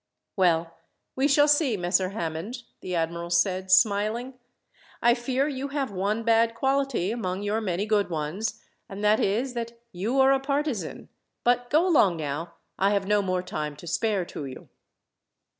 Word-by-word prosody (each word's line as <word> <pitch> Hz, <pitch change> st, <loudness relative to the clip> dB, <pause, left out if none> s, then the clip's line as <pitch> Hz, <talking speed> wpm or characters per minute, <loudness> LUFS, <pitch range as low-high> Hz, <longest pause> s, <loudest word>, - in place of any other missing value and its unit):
"Well, 170 Hz, -3 st, +1 dB, 0.4 s
we 270 Hz, +2 st, +2 dB
shall 290 Hz, +1 st, +5 dB
see, 290 Hz, -6 st, +3 dB
Messer 185 Hz, +1 st, +1 dB
Hammond," 195 Hz, +5 st, -5 dB, 0.2 s
the 180 Hz, -1 st, -4 dB
admiral 170 Hz, +1 st, -2 dB
said, 185 Hz, +2 st, +1 dB
smiling. 215 Hz, +6 st, +3 dB, 0.7 s
"I 240 Hz, -, +5 dB
fear 260 Hz, +3 st, 0 dB
you 275 Hz, -1 st, -3 dB
have 275 Hz, -4 st, -2 dB
one 200 Hz, +4 st, -1 dB
bad 230 Hz, 0 st, +3 dB
quality 270 Hz, -6 st, 0 dB
among 195 Hz, -4 st, -3 dB
your 210 Hz, +2 st, 0 dB
many 190 Hz, -1 st, -1 dB
good 210 Hz, -3 st, +1 dB
ones, 175 Hz, +8 st, -3 dB, 0.3 s
and 200 Hz, +1 st, -7 dB
that 210 Hz, +1 st, +4 dB
is 235 Hz, +6 st, 0 dB
that 235 Hz, -1 st, -4 dB, 0.2 s
you 220 Hz, +8 st, -1 dB
are 265 Hz, 0 st, +6 dB
a 270 Hz, -, +2 dB
partisan. 280 Hz, -4 st, -3 dB, 0.3 s
But 245 Hz, 0 st, +2 dB
go 320 Hz, +5 st, +3 dB
along 200 Hz, -, +4 dB
now. 155 Hz, +3 st, -4 dB, 0.2 s
I 195 Hz, -, +4 dB
have 200 Hz, -1 st, 0 dB
no 210 Hz, 0 st, +3 dB
more 185 Hz, -2 st, -1 dB
time 150 Hz, -4 st, -4 dB
to 150 Hz, -, -12 dB
spare 195 Hz, +2 st, 0 dB
to 145 Hz, -, -7 dB
you." 130 Hz, -, -10 dB
210 Hz, 165 wpm, -26 LUFS, 180-245 Hz, 0.7 s, are